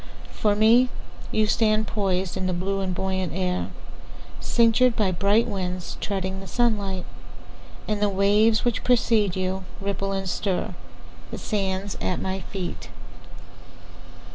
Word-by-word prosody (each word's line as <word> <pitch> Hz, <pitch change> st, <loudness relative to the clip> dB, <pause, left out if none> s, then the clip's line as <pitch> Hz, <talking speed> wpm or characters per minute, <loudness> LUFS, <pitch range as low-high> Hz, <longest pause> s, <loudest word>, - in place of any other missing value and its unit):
For 210 Hz, -1 st, +1 dB
me, 230 Hz, +4 st, +5 dB, 0.4 s
You 215 Hz, -, +2 dB
stand 215 Hz, 0 st, +2 dB
poisedIn 190 Hz, -3 st, -1 dB
the 185 Hz, -, 0 dB
blue 195 Hz, +3 st, -1 dB
and 185 Hz, -2 st, -2 dB
buoyant 190 Hz, -2 st, -2 dB
air, 185 Hz, -1 st, -1 dB, 0.7 s
Cinctured 235 Hz, +1 st, +3 dB
by 200 Hz, -4 st, +2 dB
bright 200 Hz, +5 st, +2 dB
winds, 180 Hz, -2 st, -4 dB
Treading 190 Hz, -1 st, -2 dB
the 195 Hz, -, -9 dB
sunlight. 200 Hz, -4 st, 0 dB, 0.8 s
And 210 Hz, -1 st, -1 dB
the 205 Hz, -, +3 dB
waves 205 Hz, +4 st, +3 dB
which 240 Hz, -, 0 dB
precede 225 Hz, -5 st, +3 dB
youRipple 190 Hz, +1 st, -3 dB
and 195 Hz, -, -3 dB
stirThe 185 Hz, 0 st, -5 dB
sands 195 Hz, -2 st, -2 dB
at 185 Hz, -, -1 dB
my 190 Hz, 0 st, -2 dB
feet. 185 Hz, -1 st, -6 dB
195 Hz, 120 wpm, -25 LUFS, 185-215 Hz, 0.8 s, me